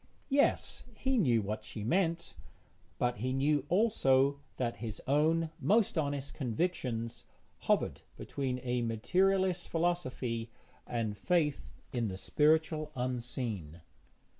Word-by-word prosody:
Yes, 280 0 +2
he 265 +3 0
knew 120 - +3
what 105 +2 -3
she 105 - -6
meant, 170 - 0 0.6
but 125 -1 0
he 130 +5 -1
knew 145 +2 +1
also 140 - +3 0.2
that 120 -2 -1
his 110 -3 -5
own 155 +3 +2
most 215 0 +3
honest 145 -3 -1
convictions 125 -4 -2 0.3
hovered - - +1 0.2
between 130 -2 -3
a 125 -1 0
materialist 180 - +1
philosophy 130 -9 -1 0.4
and 115 -3 -2
faith 150 - 0 0.2
in 120 -3 0
the 95 -2 -4
spiritual 155 - +2
unseen. 120 - -3
135 Hz, 115 wpm, -32 LUFS, 115-165 Hz, 0.6 s, knew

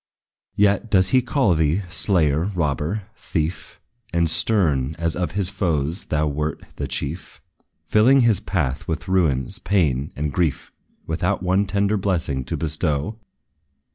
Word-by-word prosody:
Yet 100 +2 +2
does 95 -2 +3
he 130 - +4
call 125 - +2
thee, 80 +4 +1
slayer, 80 -5 +2
robber, 80 - -1
thief, 80 -4 -4 0.3
And 85 -1 +2
stern, 80 -6 +3
as 85 0 -1
of 90 -3 -2
his 100 -2 0
foes 85 -3 -1
thou 75 -1 0
wert 75 +1 -2 0.2
the - - -3
chief, 80 +6 -4 0.5
Filling 130 +6 +5
his 115 -6 +3
path 75 -10 -2
with 80 - -3
ruins, 80 -9 +1
pain 75 -9 0
and 75 +1 -3
grief, 85 -6 -1 0.3
Without 90 +4 -1
one 95 +2 +2
tender 100 +2 +1
blessing 85 -9 -1
to - - -3
bestow! 80 +5 -2
85 Hz, 140 wpm, -22 LUFS, 75-100 Hz, 0.5 s, Filling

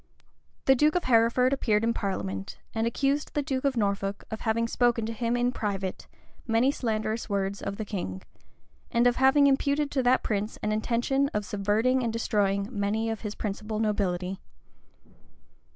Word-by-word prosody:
The 265 - +7
duke 300 +5 +3
of 360 - +1
Hereford 245 +2 +3
appeared 220 -5 +1
in 230 0 +2
parliament, 100 - -4 0.2
and 225 0 0
accused 275 +5 -1
the 295 - +1
duke 265 -1 -2
of 270 -3 +1
Norfolk 200 -1 -1
of 220 - -5
having 230 0 +1
spoken 240 -1 +1
to 225 - -3
him, 235 +1 -1
in 245 0 +1
private, 195 -5 -3 0.4
many 230 +4 +3
slanderous 220 -3 -2
words 200 0 -1
of 200 - -4
the 220 - -4
king, 95 - -5 0.7
and 235 +1 +2
of 245 0 +3
having 270 +2 +5
imputed 280 +1 +2
to 270 - +1
that 250 +1 +3
prince 210 0 -2
an 215 - 0
intention 240 +5 +1
of 210 -1 -1
subverting 215 +6 +1
and 230 - 0
destroying 200 -3 0
many 215 +1 -1
of 220 - -5
his 210 -2 -5
principal 210 +1 -4
nobility. 190 -4 -1
225 Hz, 170 wpm, -27 LUFS, 205-250 Hz, 0.7 s, The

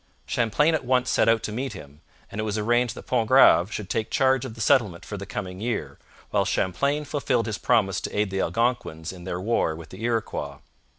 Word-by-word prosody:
Champlain 120 +8 +2
at 160 - 0
once 125 0 +1
set - - +3
out 115 -1 +3
to - - -3
meet 130 +5 -3
him, 75 +1 -12 0.3
and 105 - -3
it - - -2
was 110 0 -2
arranged 120 +2 +1
that - - -10
Pontgrave 115 -5 +5
should 105 -5 -5
take 110 +1 -2
charge 130 -1 +2
of 115 -4 -7
the - - -13
settlement 105 -6 +2
for 105 - -6
the 100 0 -7
coming 95 -3 -5
year, 105 - -3 0.3
while - - +2
Champlain 140 +11 0
fulfilled 135 -5 0
his 105 -2 -3
promise 110 -6 +2
to - - -5
aid 105 -2 +1
the 95 0 -1
Algonquins 115 -9 -1
in 90 -2 -11
their 90 -1 -3
war 95 -5 0
with 80 -1 -11
the 95 - -11
Iroquois. 115 -2 -2
110 Hz, 215 wpm, -25 LUFS, 95-125 Hz, 0.3 s, Pontgrave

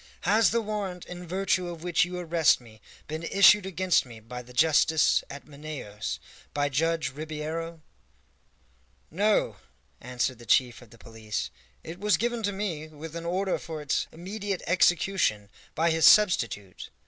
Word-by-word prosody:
"Has 215 +4 +4
the 230 0 0
warrant 200 -4 -4
in 180 0 -9
virtue 185 0 0
of 170 -1 -8
which 175 -1 +2
you 180 0 -6
arrest 170 -3 +3
me 110 -3 -17 0.3
been 155 +1 -5
issued 195 +3 +5
against 185 -1 +2
me 120 -3 -12
by 125 +3 -8
the 125 0 -15
justice 160 +3 +3
at 140 0 -9
Manaos 140 -8 -6 0.4
by 145 0 +1
Judge 165 +3 0
Ribeiro?" 155 +2 -5 1.3
"No," 205 +6 +1 0.4
answered 125 0 -2
the 120 - -14
chief 125 -2 +2
of 120 - -16
the 115 - -17
police, 110 -1 -5 0.3
"it 170 +2 -8
was 210 +1 +2
given 240 +1 -1
to 205 -1 0
me, 190 -6 -4
with 155 +1 -10
an 170 0 -5
order 185 +2 -1
for 160 -2 -7
its 145 -2 -1
immediate 195 +3 -5
execution, 175 - +2 0.2
by 165 +1 +2
his 160 -1 +5
substitute. 115 - +3
165 Hz, 155 wpm, -27 LUFS, 140-185 Hz, 1.3 s, issued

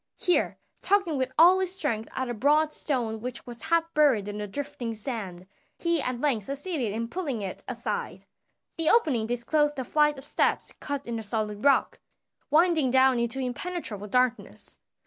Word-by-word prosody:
Here, 360 - +2 0.2
tugging 390 -6 +2
with 260 0 -1
all 355 +4 +7
his 375 0 -2
strength 230 - -2
at 260 - -2
a 240 - -3
broad 300 +6 +2
stone 230 -6 -2
which 245 0 -6
was 240 -1 -6
half 330 +1 +1
buried 270 -10 +3
in 205 0 -5
the 210 - -4
drifting 275 -1 -5
sand, 205 -6 -5 0.3
he 340 -3 +1
at 255 -2 -2
length 245 -8 0
succeeded 280 - -2
in 230 +2 -3
pulling 275 - -3
it 190 - -5
aside. 240 -2 -4 0.5
The 325 -1 +2
opening 275 - +3
disclosed 295 +5 +1
a 260 - -2
flight 300 +2 +2
of 265 - -10
steps - - 0
cut 285 -1 -5
in 235 -1 -3
the - - -4
solid 210 -1 -3
rock, 280 -1 +3 0.5
winding 315 -2 +3
down 260 -1 +4
into 235 +2 -2
impenetrable 255 - -4
darkness. 250 +2 -1
260 Hz, 170 wpm, -27 LUFS, 230-305 Hz, 0.5 s, all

